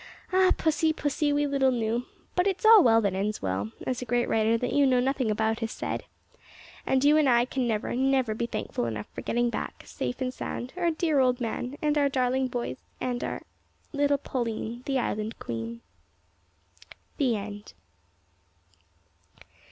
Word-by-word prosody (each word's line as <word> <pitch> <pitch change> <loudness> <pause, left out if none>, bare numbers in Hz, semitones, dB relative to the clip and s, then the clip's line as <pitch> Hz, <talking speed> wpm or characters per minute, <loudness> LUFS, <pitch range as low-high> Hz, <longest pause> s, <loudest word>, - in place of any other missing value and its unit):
Ah! 370 0 +5
pussy, 315 0 +2
pussy, 295 -1 0
we 290 0 +2
little 275 -2 +2
knew 235 0 -1 0.3
but 360 +2 +2
`it's 390 +2 -1
all 440 -1 +9
well 225 -1 +5
that 200 -3 0
ends 205 +3 -1
well,' 95 +2 -2 0.2
as 255 -1 -2
a - - -4
great 240 +1 +1
writer 225 +1 +2
that 245 +2 -2
you 285 -1 +4
know 255 -1 +4
nothing 260 -2 0
about 220 +1 0
has 225 -1 -3
said, - - -4 0.8
and 265 0 +2
you 295 +2 +6
and 300 -3 +4
I 240 -1 +4
can 255 -1 -2
never, 215 -2 -1
never 260 -3 +2
be 235 +2 -2
thankful 120 - -3
enough 105 -2 -4
for - - -6
getting 240 0 0
back, - - -5
safe 245 - -4
and 255 -1 -2
sound, 250 0 -5
our 350 -2 +1
dear 315 -2 +1
old 250 -1 +3
man, 245 +3 -3
and 300 0 +2
our 285 -1 +3
darling 260 0 +1
boys, 245 -1 -4 0.2
and 245 -1 -2
our - - -2
our - - -7 0.5
little 285 0 +2
Pauline, 235 -3 -3
the 270 -1 +1
Island 215 -2 -2
Queen." 115 0 -5 1.4
THE 255 -5 +2
END. 205 0 -7
250 Hz, 175 wpm, -27 LUFS, 225-280 Hz, 1.4 s, all